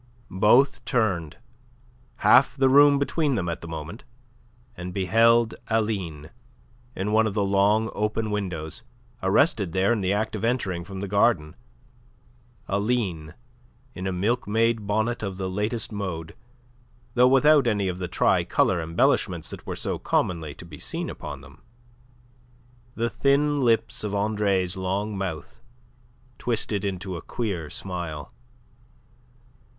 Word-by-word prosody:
Both 110 +9 +4
turned, 95 - -1 0.9
half 135 +2 +6
the 135 -1 +4
room 145 +1 +7
between 140 0 0
them 95 -6 -2
at 85 0 -3
the 85 - -8
moment, 80 +6 -7 0.7
and 90 -2 -7
beheld 115 +4 +3
Aline 95 -9 -2 0.6
in 100 +3 -2
one 110 +1 +4
of 105 - -4
the 105 - +1
long, 100 +2 +2
open 105 +1 -1
windows, 90 -1 -4 0.4
arrested 100 - +2
there 95 +4 +2
in 110 - -1
the 95 0 0
act 110 +2 -1
of 105 - -5
entering 105 -8 -1
from 95 +1 -8
the 100 - -3
garden, 95 -6 +2 1.1
Aline 100 -6 -1 0.6
in 95 -3 -5
a - - -1
milk 105 +7 -1
maid 110 0 +1
bonnet 110 +3 0
of 100 -3 -4
the 95 -1 -3
latest 105 +5 -2
mode, 90 -6 -5 0.8
though 125 0 +5
without 135 +1 +5
any 105 -4 +1
of 90 0 -3
the 90 - -3
tricolour 85 0 +2
embellishments 80 +1 0
that - - -10
were - - -3
so - - -3
commonly 80 -5 -1
to - - -12
be 80 -4 -11
seen - - -4
upon - - -8
them. - - -16 1.3
The 115 +1 0
thin 145 +1 +2
lips 115 -5 +1
of 105 -1 -2
Andre's 100 -3 0
long 95 +3 -2
mouth 95 -6 -5 0.8
twisted 110 -4 -1
into 95 -2 -3
a - - -8
queer 95 -10 -4
smile. 85 -6 -5
100 Hz, 135 wpm, -25 LUFS, 90-115 Hz, 1.3 s, room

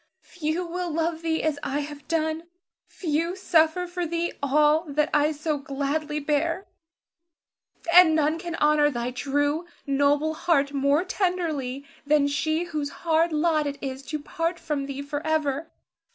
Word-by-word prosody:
few 335 +1 -3
will 355 +1 -3
love 325 +1 -1
thee 325 -1 -1
as 305 -2 0
I 280 +2 -1
have 290 0 -8
done; 320 0 -1 0.4
few 335 +1 -1
suffer 345 -2 +2
for 350 -1 -3
thee 340 +1 -2
all 300 +3 +3
that 300 +1 0
I 295 +1 +3
so 305 0 -2
gladly 285 +2 -2
bear; 325 +5 0 1.3
and 350 -3 +8
none 310 +1 +2
can 340 -1 -5
honor 300 -1 +4
thy 240 -2 -3
true, 290 +5 -1 0.2
noble 285 +3 +2
heart 290 -3 +1
more 280 +4 +2
tenderly 325 -9 -2 0.2
than 290 -1 +3
she 310 +3 0
whose 305 -4 -3 0.2
hard 330 +1 +3
lot 310 -1 +2
it 280 0 -4
is 265 -1 -5
to 305 - -2
part 330 +3 -2
from 285 -4 -3
thee 275 0 -5
forever. 295 +1 -1
305 Hz, 150 wpm, -25 LUFS, 285-330 Hz, 1.3 s, and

